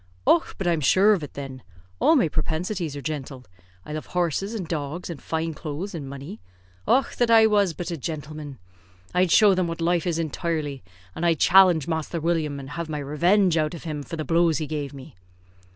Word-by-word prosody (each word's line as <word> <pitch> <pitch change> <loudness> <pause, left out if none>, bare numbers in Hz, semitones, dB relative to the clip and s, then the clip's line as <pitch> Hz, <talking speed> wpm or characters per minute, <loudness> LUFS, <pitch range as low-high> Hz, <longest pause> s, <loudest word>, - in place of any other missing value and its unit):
"Och! 170 - +3
but 195 - -4
I'm 170 -3 +1
shure 195 +9 +5
of 190 - -1
it, 145 - -8
thin. 135 -2 -7 0.4
All 325 - +5
my 250 - +4
propensities 160 +1 -2
are 140 - -7
gintale. 135 -4 -5 0.4
I 150 - -7
love 155 - -5
horses, 180 +5 -1
and 190 -6 -4
dogs, 160 +2 -4
and 160 - -8
fine 160 0 -2
clothes, 155 +6 -6
and 145 -5 -6
money. 140 -6 -8 0.5
Och! 270 - +2
that 240 -1 +2
I 225 -1 +7
was 205 -6 +2
but 175 0 -5
a 170 - -3
jintleman! 150 -2 -6 0.6
I'd 180 0 +3
show 205 +3 +6
them 185 -2 0
what 165 0 -5
life 170 +1 +1
is 170 -2 0
intirely, 155 -3 -3 0.3
and 165 - -6
I'd 165 -3 +2
challenge 180 -5 +5
Masther 160 0 -2
William, 155 -3 -1
and 135 +1 -9
have 170 0 -5
my 150 - -3
revenge 170 +6 +2
out 155 +1 0
of 165 - -10
him 155 -3 -4
for 145 +4 -7
the 155 -1 -4
blows 165 -1 +3
he 155 - -2
gave 145 -2 -4
me." 135 -8 -12
165 Hz, 205 wpm, -24 LUFS, 150-175 Hz, 0.6 s, I